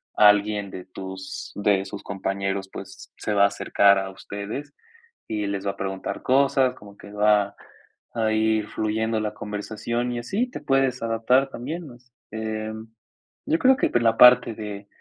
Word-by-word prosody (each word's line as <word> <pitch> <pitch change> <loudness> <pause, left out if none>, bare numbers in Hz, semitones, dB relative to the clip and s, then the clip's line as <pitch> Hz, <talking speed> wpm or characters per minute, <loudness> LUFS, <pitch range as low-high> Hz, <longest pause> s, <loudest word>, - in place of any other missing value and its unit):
alguien 105 -1 +4
de 90 - -7
tus 95 0 -8
de 100 -1 +1
sus 100 +1 -8
compañeros, 95 0 -3
pues, - - -10
se 105 - -2
va 100 -1 +4
a - - +6
acercar 100 0 +3
a 95 0 -4
ustedes 100 +9 -7 0.5
y 105 -2 -2
les 100 0 -3
va 100 - +1
a 100 - -16
preguntar 95 0 -4
cosas, 130 -1 +3
como 100 -1 -15
que 100 - -12
va 105 -1 +3 0.6
a 110 -2 0
ir 110 -1 +1
fluyendo 110 +1 -1
la 105 -1 -3
conversación 110 +4 -3
y 120 - -3
así 200 - -1
te - - -6
puedes 135 -2 +1
adaptar 115 +4 +2
también 155 +7 -6
más. 125 -1 -16 0.2
Em, 110 0 -5 0.6
yo 160 - +2
creo 265 0 +5
que - - +1
por 120 - +1
la 115 -1 +3
parte 125 -1 +7
de 105 -2 -7
110 Hz, 170 wpm, -24 LUFS, 100-120 Hz, 0.6 s, parte